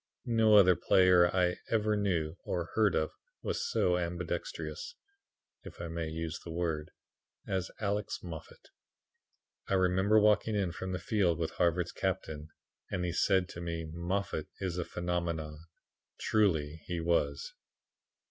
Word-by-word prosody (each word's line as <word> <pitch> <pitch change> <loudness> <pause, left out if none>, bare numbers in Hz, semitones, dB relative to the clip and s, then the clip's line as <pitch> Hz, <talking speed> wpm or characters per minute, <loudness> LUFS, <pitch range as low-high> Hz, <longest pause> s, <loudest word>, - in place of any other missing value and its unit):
No 115 -3 +4
other 95 -3 +7
player 90 0 +5
I 90 -1 +1
ever 110 -1 +2
knew 85 -6 0
or 85 -2 -3
heard 105 -4 +3
of 80 - +1 0.3
was - - -2
so 90 -1 +2
ambipedextrous 285 - -4 0.7
(if - - -11
I 85 - -5
may 85 0 -3
use 80 0 -4
the - - -10
word) 80 -2 -2 0.6
as 95 -1 -1
Alex 105 0 -2
Moffat. 80 -3 -9 1.0
I 95 - +1
remember 95 +3 +4
walking 105 +1 +3
in 95 -4 0
from 95 +2 -5
the 90 - -1
field 90 -2 +1
with 80 -1 -2
Harvard's 90 0 +1
captain, 80 -5 -3 0.4
and 90 -2 -2
he 85 - -2
said 95 0 +3
to 85 - -8
me 85 -1 -3
'Moffat 85 -2 -2
is 90 -2 -2
a 85 - -1
phenomenon.' 85 -3 -3 0.5
Truly 80 -8 +1
he 90 -1 -2
was." 75 -4 0
90 Hz, 140 wpm, -32 LUFS, 85-100 Hz, 1.0 s, other